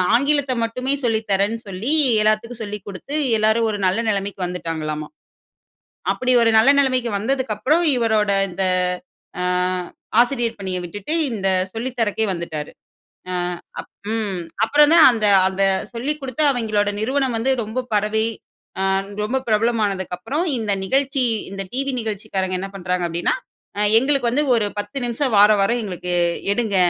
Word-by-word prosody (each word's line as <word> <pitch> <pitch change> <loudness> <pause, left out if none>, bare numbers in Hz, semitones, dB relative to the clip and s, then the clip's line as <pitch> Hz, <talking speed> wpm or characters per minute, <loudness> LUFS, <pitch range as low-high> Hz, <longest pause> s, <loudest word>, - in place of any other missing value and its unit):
ஆங்கிலத்த 280 +1 +2
மட்டுமே 255 +4 -1
சொல்லி 225 -2 +2
தரேன்னு 200 +4 +1
சொல்லி 195 +9 -3 0.3
எல்லாத்துக்கும் 215 +2 0
சொல்லிக் 205 -1 -7
குடுத்து 205 +9 -7 0.2
எல்லாரும் 220 +2 +2
ஒரு 205 - -2
நல்ல 190 +5 +1
நிலைமைக்கு 200 -1 -2
வந்துட்டாங்களாமா. 160 -4 -4 1.0
அப்புடி 255 0 0
ஒரு 230 - +4
நல்ல 230 +5 +6
நிலைமைக்கு 255 -4 +1
வந்ததுக்கப்பறம் 265 +6 0
இவரோட 220 -3 +1 0.2
இந்த, 190 +2 -2 0.8
அ - - 0 0.8
ஆசிரியர் 240 -3 +1
பணிய 185 -1 -3
விட்டுட்டு 205 - -5 0.2
இந்த 195 -3 -1 0.2
சொல்லித்தரக்கே 225 -2 -1
வந்துட்டாரு. 160 -4 -5 0.6
அ, - - -2 0.8
ம், 205 -5 -2 0.2
அப்பறம் 295 +6 +4
தான் 335 - +8
அந்த 220 -3 0 0.2
அந்த 190 +1 -2 0.3
சொல்லிக் 280 +6 -2
கொடுத்து 265 +2 -3
அவுங்களோட 215 -5 0
நிறுவனம் 260 +1 0
வந்து 260 +4 0
ரொம்ப 235 +4 -4
பரவி, 210 +1 +1 0.6
அ - - +1 0.4
ரொம்ப 260 +5 0
பிரபலமானதுக்கப்பறம் 215 - 0
இந்த 210 -2 -1
நிகழ்ச்சி 270 +3 +1 0.3
இந்த 195 0 -5
டிவி 275 +1 -1
நிகழ்ச்சிக்காரங்க 195 -4 -3
என்ன 195 - -4
பண்றாங்க 180 -1 -1
அப்டீன்னா 170 - 0 0.4
அ, - - +1 0.2
"எங்களுக்கு 265 -2 +1
வந்து 295 +5 +1
ஒரு 215 -3 +1
10 205 +6 -6
நிமிஷம் 240 0 -1
வாரா 210 +1 +7
வாரம் 235 +4 +1
எங்களுக்கு 180 -3 -4 0.4
எடுங்க. 220 -4 0
220 Hz, 135 wpm, -21 LUFS, 195-255 Hz, 1.0 s, தான்